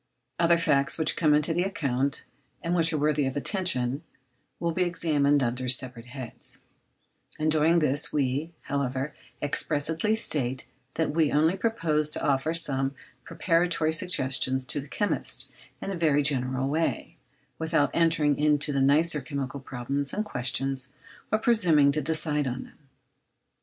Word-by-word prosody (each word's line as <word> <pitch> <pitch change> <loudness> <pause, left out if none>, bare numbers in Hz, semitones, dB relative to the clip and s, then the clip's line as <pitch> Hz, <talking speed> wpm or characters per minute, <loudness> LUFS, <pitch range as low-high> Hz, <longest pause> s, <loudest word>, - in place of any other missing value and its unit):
Other 170 0 +4
facts 140 -4 +1
which 160 -1 +2
come 150 -2 +3
into 150 +2 +1
the 175 - 0
account, 140 -8 -2 0.4
and 170 - -1
which 165 -1 +3
are 155 - -1
worthy 150 -1 +1
of 135 - -3
attention, 140 - -1 0.6
will 170 -1 -1
be 185 - -1
examined 145 -5 +2
under 125 +1 -2
separate 125 -1 +2
heads; 130 -1 -3 0.7
in 155 0 0
doing 160 +2 +3
this 150 -2 +1
we, 145 +3 -1
however, 135 +1 -3 0.3
expressly 160 +7 +1
state 135 - -1 0.3
that 160 - 0
we 155 -1 +1
only 160 +4 +2
propose 165 -8 0
to - - -2
offer 140 +2 +1
some 135 -4 +2 0.3
preparatory 165 -1 +1
suggestions 130 -5 +1
to 145 - +2
the 140 - -12
chemist 205 +8 -2 0.3
in 195 - -4
a - - -3
very 150 -4 +2
general 130 -2 -1
way, 160 +4 -2 0.4
without 160 -2 +1
entering 160 -4 +2
into 150 -1 +2
the 135 - +1
nicer 150 +3 +3
chemical 135 +1 -5
problems 135 +2 -3
and 215 - -1
questions, 130 -2 -2 0.4
or 215 - +3
presuming 175 -12 +3
to 155 +2 -1
decide 150 -2 -1
on 125 0 -4
them. - - -18
150 Hz, 145 wpm, -26 LUFS, 135-165 Hz, 0.7 s, Other